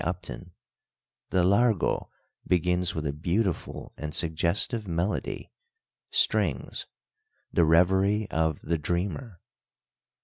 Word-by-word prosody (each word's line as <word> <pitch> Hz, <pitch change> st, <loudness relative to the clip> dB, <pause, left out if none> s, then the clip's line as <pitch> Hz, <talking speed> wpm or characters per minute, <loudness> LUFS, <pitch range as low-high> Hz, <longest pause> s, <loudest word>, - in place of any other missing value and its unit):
Upton, 90 Hz, 0 st, -5 dB, 0.8 s
"the 90 Hz, -, +2 dB
Largo 100 Hz, +2 st, +2 dB, 0.4 s
begins 90 Hz, 0 st, +1 dB
with 80 Hz, -1 st, -3 dB
a 70 Hz, -, -1 dB
beautiful 85 Hz, +5 st, -2 dB
and 75 Hz, +1 st, -4 dB
suggestive 85 Hz, +7 st, +1 dB
melody 85 Hz, +4 st, -2 dB, 0.6 s
[strings] -, -, 0 dB, 0.7 s
the 85 Hz, -, +4 dB
revery 95 Hz, +6 st, +3 dB
of 80 Hz, -2 st, 0 dB
the 85 Hz, 0 st, -1 dB
dreamer." 90 Hz, -, -3 dB
90 Hz, 95 wpm, -27 LUFS, 80-100 Hz, 0.8 s, the